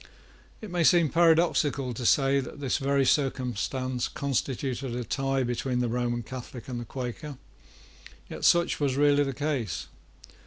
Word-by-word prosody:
It 215 -4 -8
may 175 -1 +1
seem 170 -2 +5
paradoxical 160 -5 +3
to 120 +1 -2
say 135 0 +4
that 135 +2 -7
this 135 -3 -1
very 140 0 +2
circumstance 130 -2 0
constituted 135 -2 -2
a 125 - -3
tie 135 +3 -1
between 125 +1 -2
the 125 -1 0
Roman 120 0 -1
Catholic 125 0 -8
and 125 -2 -4
the 120 - -6
Quaker; 130 +4 -6 0.9
yet - - -8
such 170 0 +3
was 140 -3 0
really 145 0 +4
the 135 - -2
case. 135 - -3
135 Hz, 150 wpm, -27 LUFS, 125-145 Hz, 0.9 s, seem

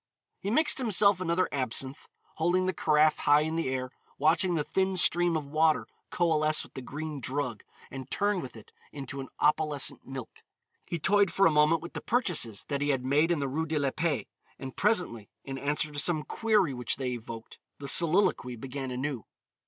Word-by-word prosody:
He 195 - -4
mixed 295 +5 +2
himself 200 -5 +3
another 180 +1 +1
absinthe, 130 +1 -2 0.3
holding 175 +3 +1
the 185 - 0
carafe 155 -1 +2
high 145 +1 +4
in 160 +1 -2
the 165 -5 -1
air, 130 -1 -3 0.3
watching 165 +4 +2
the 150 - 0
thin 190 +3 -1
stream 175 -1 +4
of 150 - -5
water 155 +2 +2 0.2
coalesce 155 -3 +2
with - - -16
the 130 - -7
green 150 +3 -6
drug 125 -2 -3 0.3
and 135 -1 -8
turn 205 -2 0
with 130 - -9
it 110 - -15 0.2
into 140 -1 -7
an 135 - -8
opalescent 150 -2 0
milk. 130 -3 -8 0.5
He 170 - -3
toyed 200 +3 +3
for 195 - +3
a 165 - +5
moment 150 +2 +3
with 170 - -9
the - - -5
purchases 175 - 0
that 140 -1 -4
he 145 - 0
had 130 -3 0
made 145 +5 +2
in 170 - +1
the 140 -1 -2
Rue 160 +5 -2
de 155 0 -1
la 140 -2 0
Paix, 150 -9 -2 0.3
and 135 -1 -8
presently, 180 - 0
in 135 -1 -6
answer 150 +2 0
to 145 - -3
some 155 -1 +2
query 210 -9 +1
which 125 -1 -2
they 130 -2 -3
evoked, 115 -1 -8 0.2
the 140 - -8
soliloquy 170 -6 +3
began 130 +2 -6
anew. 130 -2 -4
150 Hz, 190 wpm, -28 LUFS, 135-175 Hz, 0.5 s, a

